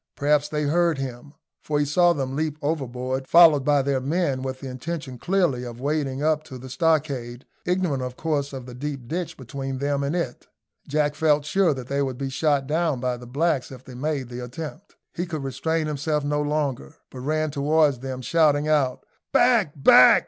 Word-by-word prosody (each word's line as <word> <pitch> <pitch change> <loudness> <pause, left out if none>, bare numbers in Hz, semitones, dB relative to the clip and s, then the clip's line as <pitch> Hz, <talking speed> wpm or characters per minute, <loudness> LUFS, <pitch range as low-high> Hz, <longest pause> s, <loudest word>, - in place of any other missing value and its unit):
Perhaps 150 +1 +2
they 150 0 -1
heard 165 +1 +2
him, 135 +2 -6 0.3
for 150 - -1
he 145 - +2
saw 175 +5 +4
them 135 -4 -2
leap 155 0 -1
overboard, 130 -3 -2
followed 165 -5 +7
by 145 -1 +3
their 135 -1 +1
men, 145 -2 0
with 130 0 -4
the 135 - -7
intention 130 0 -5
clearly 175 -9 +1
of 120 -1 -7
wading 140 -1 -1
up 155 0 +2
to 130 -4 -9
the 130 +1 -10
stockade, 140 -6 0 0.2
ignorant 180 -7 0
of 125 0 -5
course 145 -3 -1
of 130 -3 -7
the 125 - -9
deep 135 -1 -5
ditch 170 +3 -4
between 135 +1 -5
them 140 +1 -1
and 140 +4 -1
it. 165 -9 -3 0.4
Jack 150 0 +1
felt 150 -1 +2
sure 185 +3 +3
that 130 -2 -6
they 140 +2 -1
would 130 -3 -2
be 135 0 -3
shot 145 -1 +1
down 155 -1 0
by 125 0 -1
the 120 0 -11
blacks 140 0 0
if 130 -1 -10
they 130 - -10
made 140 0 -2
the 125 0 -6
attempt. 155 +8 -8 0.2
He 175 +2 -3
could 155 -4 -4
restrain 160 +4 -1
himself 150 0 -1
no 145 +1 0
longer, 145 - -2 0.2
but 130 - -9
ran 155 +3 -1
towards 145 -1 +2
them, 130 0 -5
shouting 150 -1 +3
out, 145 -5 +1 0.3
"Back, 220 -12 +4
back! 135 -3 +7
145 Hz, 195 wpm, -24 LUFS, 130-155 Hz, 0.4 s, followed